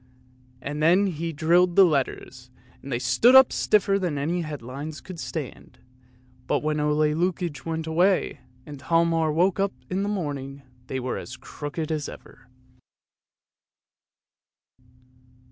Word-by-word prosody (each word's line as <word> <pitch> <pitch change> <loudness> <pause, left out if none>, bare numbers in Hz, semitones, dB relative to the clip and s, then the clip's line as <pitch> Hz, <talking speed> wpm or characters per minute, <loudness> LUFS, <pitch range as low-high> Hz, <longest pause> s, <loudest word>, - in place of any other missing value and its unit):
" 125 0 -31
and 150 +2 -4
then 175 +6 +4
he 165 -3 -3
drilled 170 +3 +2
the 195 - +8
letters 130 -4 -2 0.3
and 140 - -9
they 120 - 0
stood 130 - +4
up 265 -1 +8
stiffer 200 -2 +2
than 175 -6 -2
any 165 +5 -1
headlines 145 0 -7
could 170 +6 -10
stand. 155 -6 -7 0.7
But - - 0
when 155 0 0
Ole 150 0 +1 0.2
Lukoie 170 -4 -2
went 160 -1 -3
away 175 +4 +1 0.3
and 145 -3 -10
Hialmar 165 -1 +2
woke 175 +5 +1
up 195 0 0 0.2
in 185 +2 0
the 200 - -1
morning 140 -8 -4 0.2
they 130 - -3
were 130 0 -3
as - - -9
crooked 155 +2 -6
as 150 -2 -2
ever. - - -14
160 Hz, 140 wpm, -25 LUFS, 140-180 Hz, 0.7 s, the